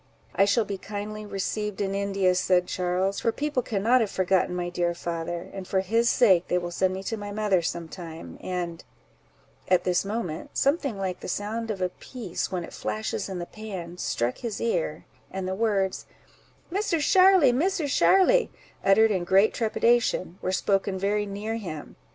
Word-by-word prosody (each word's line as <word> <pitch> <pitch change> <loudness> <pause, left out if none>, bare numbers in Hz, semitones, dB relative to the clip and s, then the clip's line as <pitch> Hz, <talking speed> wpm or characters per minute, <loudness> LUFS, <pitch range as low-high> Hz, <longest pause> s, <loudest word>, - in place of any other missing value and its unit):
—"I 195 - +4
shall 210 +2 +2
be 200 -2 -5
kindly 210 +1 -6
received 210 +1 -3
in 195 -1 -1
India," 195 -2 +1
said 180 0 +2
Charles, 185 +2 -1
"for 230 - +1
people 290 0 -1
cannot 230 +3 +2
have 220 - 0
forgotten 185 -1 +1
my 175 -1 -2
dear 175 -1 -1
father; 170 +1 -4
and 190 -2 -7
for 190 - +1
his 230 +5 +2
sake 190 -8 +4
they 180 - +1
will 175 -1 -3
send 185 +1 +1
me 190 - -5
to 225 +3 -3
my 205 -1 -6
mother 205 -3 +1
some 170 0 -3
time; 165 -1 -9
and—" 175 -2 -4 0.8
at 185 - +3
this 180 -1 +1
moment, 200 -6 -4
something 275 - +1
like 190 -2 -3
the - - -8
sound 220 +4 -3
of 195 -4 -2
a 180 - +1
piece 215 -1 -5
when 180 -2 -2
it - - -10
flashes 215 -2 -3
in 190 - -4
the 175 - -4
pan, 180 -5 -8
struck 120 +1 -1
his 230 -4 -4
ear, 165 -8 -1 0.2
and 190 -1 -4
the 190 - -1
words, 195 -2 0 0.6
"Misser 390 -2 0
Sharly, 370 -2 +6
Misser 335 +5 +1
Sharly," 385 - +4 0.3
uttered 220 +3 +5
in 185 -3 0
great 195 +4 +4
trepidation, 225 -5 +1
were 185 - -1
spoken 195 0 +1
very 205 +2 0
near 210 +3 -3
him. 160 -9 -7
195 Hz, 180 wpm, -26 LUFS, 180-220 Hz, 0.8 s, Sharly